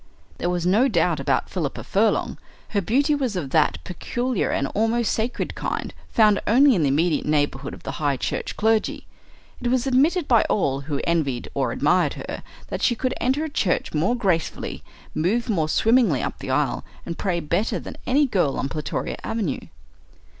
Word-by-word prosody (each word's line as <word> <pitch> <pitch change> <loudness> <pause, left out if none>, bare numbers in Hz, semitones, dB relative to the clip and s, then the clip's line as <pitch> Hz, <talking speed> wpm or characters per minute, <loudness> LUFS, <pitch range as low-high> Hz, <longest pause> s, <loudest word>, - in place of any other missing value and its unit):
There 175 - 0
was 175 -1 -1
no 210 +9 +4
doubt 170 - +1
about 135 - 0
Philippa 160 -7 -3
Furlong. 215 +3 +1 0.3
Her 205 - 0
beauty 275 - +2
was 260 -7 -1
of 145 -7 -3
that 85 - +3
peculiar 240 - -2
and 135 - 0
almost 225 +2 +1
sacred 230 +3 -2
kind - - -3 0.2
found 210 -3 +4
only 265 +5 +6
in 185 - +1
the 145 - +3
immediate 155 +4 +1
neighbourhood 145 -2 0
of - - -16
the - - -4
High 145 -2 +1
Church - - -3
clergy. 220 0 +1 0.6
It - - -1
was 255 +1 +1
admitted 290 +6 +2
by 230 -4 +5
all 140 -9 +1
who 145 0 -3
envied 155 -8 -1
or 130 -4 0
admired 150 +2 +2
her - - -6 0.3
that - - -4
she 240 - +3
could 255 +2 -1
enter 265 +5 +1
a - - -2
church 205 - -1
more 170 +10 +1
gracefully, 185 -9 -1 0.3
move 225 +9 0
more 160 -7 +1
swimmingly 225 - +3
up - - -4
the - - -6
aisle, - - 0 0.2
and 170 - -4
pray 180 -4 0
better 170 +7 0
than - - -9
any 285 +3 +4
girl 180 - +1
on 135 - -2
Plutoria 150 +1 -3
Avenue. 220 -10 -2
195 Hz, 180 wpm, -23 LUFS, 155-240 Hz, 0.6 s, only